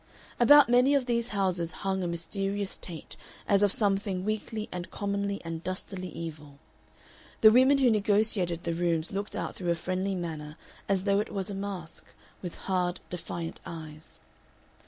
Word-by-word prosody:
About 290 +4 +8
many 250 +4 +5
of 275 -3 +2
these 235 -1 0
houses 185 -6 0
hung 190 -1 0
a 180 - -1
mysterious 195 +4 -2
taint 165 -4 -7 0.3
as 200 -1 +4
of 205 -2 +4
something 195 -3 +1
weakly 215 0 -2
and 180 -1 -5
commonly 200 0 -2
and 165 0 -5
dustily 185 0 -4
evil; 150 -4 -8 0.8
the 220 - +9
women 260 +4 +6
who 260 -3 +4
negotiated 205 -5 +1
the 170 - -1
rooms 165 -1 0
looked 200 +1 -3
out - - -3
through 180 -2 -3
a 170 - +3
friendly 185 +3 -2
manner 155 -3 -5 0.3
as 195 -2 +2
though 200 0 +3
it 210 - -2
was 195 0 -3
a - - -4
mask, 195 -4 -6 0.4
with 180 -2 -6
hard, 180 -1 0
defiant 170 -1 -5
eyes. 155 -2 -9
190 Hz, 160 wpm, -29 LUFS, 170-205 Hz, 0.8 s, the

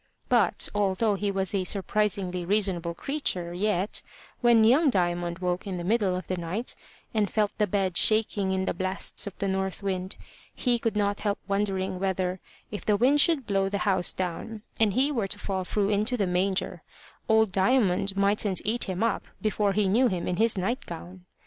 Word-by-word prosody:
But, - - +3
although 205 +1 +1
he 200 +1 -2
was 195 0 0
a 195 -2 0
surprisingly 195 -1 0
reasonable 180 -3 0
creature, 185 - -2
yet, 195 +1 0 0.4
when 235 -2 +5
young 275 +8 +5
Diamond 175 -4 -1
woke 180 +1 -2
in 190 -2 -3
the 175 - -5
middle 200 -1 +1
of 185 - -5
the 185 - -3
night, 180 +8 -3 0.4
and 210 -3 +1
felt 210 -2 0
the 210 - +2
bed 190 -2 0
shaking 210 -3 +2
in 190 0 -1
the - - -1
blasts 185 +2 0
of 200 - -8
the 200 - -2
north 190 +1 -2
wind, 190 -1 -3 0.4
he 245 -2 +1
could 225 -2 -1
not 205 -1 0
help 205 -1 -1
wondering 195 -2 -1
whether, 185 -1 -1 0.3
if 205 - -6
the 210 -1 +2
wind 270 +6 +5
should 305 -6 +3
blow 195 -2 0
the 200 - -2
house 190 -3 +1
down, 185 +4 -5 0.2
and 215 -3 +3
he 270 +6 +2
were 230 -8 -1
to 205 - -1
fall 190 -2 -3
through 200 +2 -1
into 215 +4 0
the 205 - +1
manger, 185 +2 -1 0.5
old 220 -2 +4
Diamond 195 -2 +2
mightn't 200 -2 +2
eat 230 +4 0
him 190 +1 -2
up 230 -2 -1
before 210 -2 0
he 205 0 +1
knew 235 +7 +3
him 185 -6 -2
in 180 - -1
his 220 0 +3
night 230 +8 -1
gown. 175 +2 -9
200 Hz, 190 wpm, -27 LUFS, 185-215 Hz, 0.5 s, when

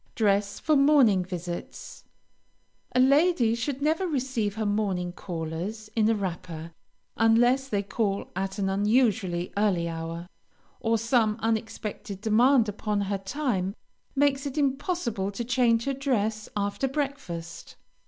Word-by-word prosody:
DRESS 200 -2 +1
FOR 310 - +2
MORNING 275 -9 +5
VISITS 175 -1 -7 0.9
A - - +4
lady 275 -2 +4
should 265 +4 -3
never 320 +5 +1
receive 255 - -1
her 220 -1 -2
morning 200 -4 0
callers 180 +6 -5
in 220 -1 +3
a 225 - +3
wrapper, 170 -4 -5 0.4
unless 240 +4 +4
they 205 -5 -1
call 200 -1 -2
at 195 +1 -3
an 195 -1 0
unusually 200 -3 +1
early 190 -5 +2
hour, 165 +1 -5 0.5
or 230 -1 +1
some 230 -1 +2
unexpected 220 -2 -3
demand 230 +3 +4
upon 210 0 -2
her 200 0 -1
time 195 -3 -2 0.4
makes 280 0 +2
it 280 +2 -6
impossible 270 - -1
to 235 +4 -4
change 235 -1 +2
her 275 - 0
dress 220 -6 -1
after 205 +6 -1
breakfast. 265 - -5
215 Hz, 130 wpm, -27 LUFS, 195-260 Hz, 0.9 s, MORNING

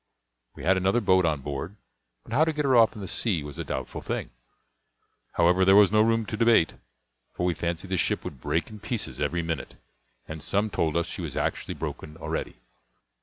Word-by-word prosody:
We - - -10
had 95 +4 +4
another 95 +6 +2
boat 95 -5 +3
on 75 -3 0
board; 70 +7 -5 0.5
but - - -9
how 145 +5 +5
to 160 - +2
get 150 -1 -1
her 130 -2 +4
off 115 -2 +6
into 105 - -9
the 95 - -5
sea 90 -5 0
was 75 -1 -8
a - - -2
doubtful 65 - -5
thing; - - -4 1.0
however, 90 +2 +4
there 95 +1 +6
was 100 -2 +7
no 110 0 +5
room 115 0 +2
to 105 - -4
debate, 115 -7 +4 0.6
for 90 - -1
we 90 - +2
fancied 85 +3 -3
the 95 - +1
ship - - 0
would 65 - -8
break 80 - -1
in 105 - -9
pieces 115 +2 -4
every 85 0 0
minute, 80 -3 -4 0.5
and 80 0 -7
some 100 +7 0
told 80 -3 0
us 85 - +1
she - - -6
was - - -5
actually - - -2
broken 75 0 -6
already. 80 - -4
95 Hz, 210 wpm, -27 LUFS, 80-110 Hz, 1.0 s, was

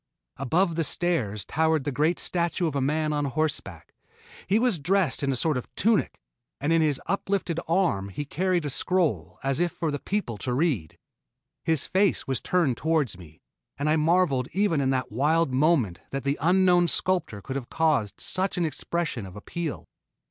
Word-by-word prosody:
Above 165 +7 +1
the 165 0 0
stairs 125 - -1
towered 160 -1 +1
the 145 - -2
great 150 +6 +1
statue 175 0 -1
of 155 -3 -2
a 140 - +1
man 150 +3 0
on 145 -1 0
horseback. 135 - -3 0.5
He 200 - +3
was 230 -7 +1
dressed 185 +3 +1
in 140 -1 +1
a - - 0
sort 150 +2 +1
of 125 - -6
tunic, 220 -1 +1 0.4
and 150 +4 +1
in 165 - +4
his 150 -4 +2
uplifted 190 -2 -1
arm 165 - +1
he 145 +10 -5
carried 180 +2 0
a 145 - -1
scroll 125 - 0
as 135 +2 0
if 175 -1 +1
for 160 -1 -2
the 145 - -3
people 160 - -3
to 125 -1 -2
read. 130 - 0 0.7
His 160 -4 0
face 190 0 +1
was 135 -3 -2
turned 165 -10 +1
toward 155 - 0
me, 80 -3 -15 0.4
and 145 +2 -1
I 155 - +3
marveled 155 -5 +2
even 190 -6 +2
in 135 - +1
that 130 -4 -1
wild 150 +5 +2
moment 130 - +2
that 135 0 -4
the 140 +1 -1
unknown 180 +1 +4
sculptor 175 - 0
could 130 +6 -6
have 130 -3 -4
caught 150 -11 +1
such 190 0 0
an 175 - +1
expression 155 - -3
of 95 - -12
appeal. 155 +9 -5
155 Hz, 185 wpm, -26 LUFS, 130-175 Hz, 0.7 s, in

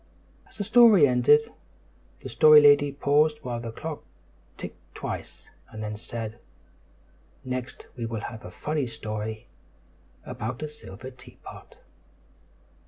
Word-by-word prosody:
As - - -15
the 205 - -2
story 220 -6 +6
ended, 220 - +3 0.7
the - - -7
Story 155 -1 +7
Lady 145 -1 +5
paused 145 +2 +2
while 120 -3 -4
the 115 -1 -6
clock 155 +6 -7 0.5
ticked - - -11
twice, - - -7 0.2
and 110 0 -8
then 105 0 -4
said, 115 +1 -7 1.1
"Next 130 -1 -5
we 115 -2 -4
will 115 -2 -4
have 110 0 -8
a - - -8
funny 150 +7 -3
story 110 -1 -6 0.8
about 120 +6 -5
a - - -2
silver 130 -4 -11
teapot." 125 - -14
125 Hz, 125 wpm, -26 LUFS, 110-150 Hz, 1.1 s, Story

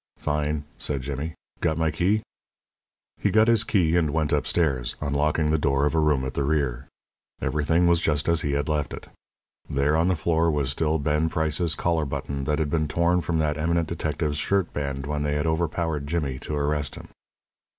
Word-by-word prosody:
"Fine," 75 0 -1 0.2
said 70 -3 -2
Jimmy. 70 +4 -4 0.2
"Got 80 -2 0
my 80 -1 +1
key?" 95 +7 +1 1.0
He - - +1
got 110 +1 +4
his 115 -2 +4
key 85 -7 +2
and 85 -3 +2
went 80 0 0
upstairs, 75 -4 0
unlocking 75 +2 +1
the 80 - +2
door 70 -1 +2
of 75 - 0
a 80 - +2
room 75 -4 +2
at 65 - -4
the 70 - -1
rear. 70 -4 -1 0.5
Everything 80 +3 +1
was 85 -1 +4
just 75 -3 +1
as 85 -1 +3
he 70 - -1
had 70 +2 0
left 75 -4 -1
it. - - -12 0.6
There 70 +2 +1
on 85 +2 +3
the 95 - +2
floor 85 +1 +1
was 70 -4 0
still 80 +2 +1
Ben 75 +2 +1
Price's 80 0 0
collar 85 -3 0
button 70 0 -4
that 75 +1 +1
had 75 -3 -1
been 80 -1 +1
torn 85 +3 +2
from 80 0 -1
that 75 -1 0
eminent 85 +1 +1
detective's 75 -2 -2
shirt 95 +2 0
band 70 -2 -3
when 75 0 -2
they 75 0 0
had 75 +1 0
overpowered 80 -2 -1
Jimmy 70 -5 -2
to 75 - -4
arrest 75 0 -1
him. - - -11
75 Hz, 195 wpm, -25 LUFS, 75-80 Hz, 1.0 s, got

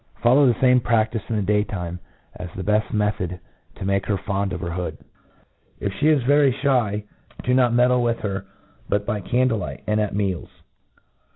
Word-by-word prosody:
iFollow 130 +4 +6
the 115 - -5
fame 125 -1 +5
pr^ftice 110 0 0
in 115 - -1
the 105 - 0
day 105 +2 +2
time, 90 -4 -5 0.4
as 90 0 -7
the 95 - -4
beft 105 +2 +1
method 95 -4 -1 0.4
to - - -6
make 100 0 0
her 100 - +1
fond 100 0 -2
of 85 - -4
her 85 +1 -4
hood. 90 +1 -4 0.8
If 100 -2 -2
' - - -10
fte 155 0 +5
is 130 - -2
very 140 +1 +4
fhy, 120 -7 +1 0.4
do 125 - +1
not 125 -2 +4
meddle 125 +1 +3
with 120 -1 +1
her 100 -1 -3 0.4
but 100 0 0
by 105 0 -2
candle 125 +2 +1
light, - - -6
and 105 0 +1
at 105 -2 -2
meals. 95 -3 -2
105 Hz, 195 wpm, -23 LUFS, 100-125 Hz, 0.8 s, iFollow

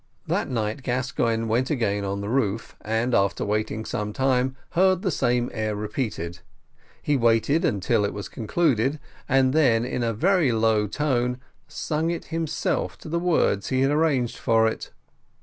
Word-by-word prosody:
That - - -1
night 110 0 -2
Gascoigne 120 -3 -1
went 120 +3 0
again 105 -8 0
on 100 0 -3
the 100 - -4
roof, 115 -4 -1
and 110 +3 0
after 100 -2 +1
waiting 110 +1 -2
some 105 0 -3
time, 130 +1 +1 0.2
heard 185 +1 +3
the 190 - +1
same 120 -3 0
air 110 -2 -2
repeated: 105 -5 -4 0.6
he 145 - +1
waited 120 +6 +2
until 105 - +1
it 100 - 0
was 100 - -6
concluded, 135 +2 0 0.3
and 130 -1 +3
then, 120 -7 +3
in 125 - -3
a 115 -1 +1
very 165 - +2
low 110 -1 +2
tone, 125 0 0 0.3
sang 160 +1 -2
it 170 - -3
himself 165 -2 -1
to - - -10
the 170 +2 0
words 165 - +1
he 130 0 +1
had 135 +1 +3
arranged 145 -6 +1
for 115 0 +3
it. 110 - -4
120 Hz, 165 wpm, -24 LUFS, 110-145 Hz, 0.6 s, heard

